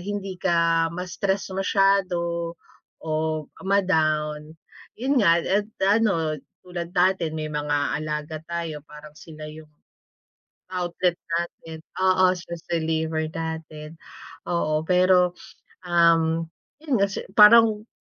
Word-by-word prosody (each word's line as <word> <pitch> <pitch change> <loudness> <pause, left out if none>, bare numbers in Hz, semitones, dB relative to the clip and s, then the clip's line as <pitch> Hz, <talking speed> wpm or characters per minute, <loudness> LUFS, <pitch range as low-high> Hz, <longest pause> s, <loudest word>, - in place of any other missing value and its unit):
hindi 195 -1 -5
ka 165 -2 +2
ma-stress 190 +2 -2
masyado 180 -4 +1 0.5
o, 155 0 -2 0.2
ma-down. 155 -5 +1 0.4
Yun 265 +2 +1
nga, 170 -3 +5
eh, 205 +2 0 0.2
ano, 195 -8 +2 0.2
tulad 175 -1 -7
natin 180 -3 +2
may 155 -1 -4
mga 145 -1 -1
alaga 150 0 -4
tayo 170 -3 -4
parang 150 0 -13
sila 155 -1 -10
yung, 155 0 -12 1.1
outlet 180 -1 -1 0.2
natin, 165 -1 -5 0.2
oo, 185 0 +4
stress 170 -2 -7
reliever 160 -1 -1
natin. 160 -1 -7 0.5
Oo, 155 -3 0
pero, 180 -1 +4 0.5
um, 165 -1 +3 0.4
'yun 275 -9 0
nga 200 - +3
kasi 195 - -5
parang 215 0 +7
170 Hz, 105 wpm, -24 LUFS, 155-185 Hz, 1.1 s, parang